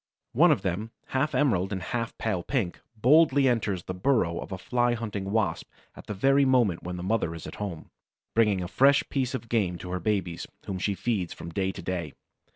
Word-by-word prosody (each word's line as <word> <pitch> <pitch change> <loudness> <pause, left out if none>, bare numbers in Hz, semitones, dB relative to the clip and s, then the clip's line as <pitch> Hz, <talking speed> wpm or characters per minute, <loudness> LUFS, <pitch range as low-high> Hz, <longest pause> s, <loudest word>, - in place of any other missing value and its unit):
One - - +6
of - - +1
them, 95 +5 -2 0.2
half 140 +2 0
emerald 110 -9 +2
and 95 - -2
half 115 -2 -3
pale 105 -6 -1
pink, 105 -5 -2
boldly 140 +3 +5
enters 105 -7 0
the 95 - -5
burrow 90 -5 +1
of - - -7
a 95 - -3
Fly 120 +5 +1
hunting 105 -4 -4
Wasp 110 -1 0 0.3
at - - -12
the 105 - -4
very 135 +7 +4
moment 120 -10 +3
when 90 0 -5
the 90 - -5
mother 95 -4 0
is 80 - -8
at - - -8
home, 90 -6 -5 0.4
bringing 105 -5 +3
a - - -4
fresh 135 +10 +4
piece 130 -2 -1
of 120 -2 -6
game 100 -7 0
to 90 +1 -8
her 90 - -1
babies, 90 -3 -2 0.2
whom 95 -1 -4
she 100 +1 0
feeds 95 -2 -1
from 85 - -8
day 95 +2 0
to 95 - -9
day. 85 -3 -3
105 Hz, 210 wpm, -27 LUFS, 90-120 Hz, 0.4 s, One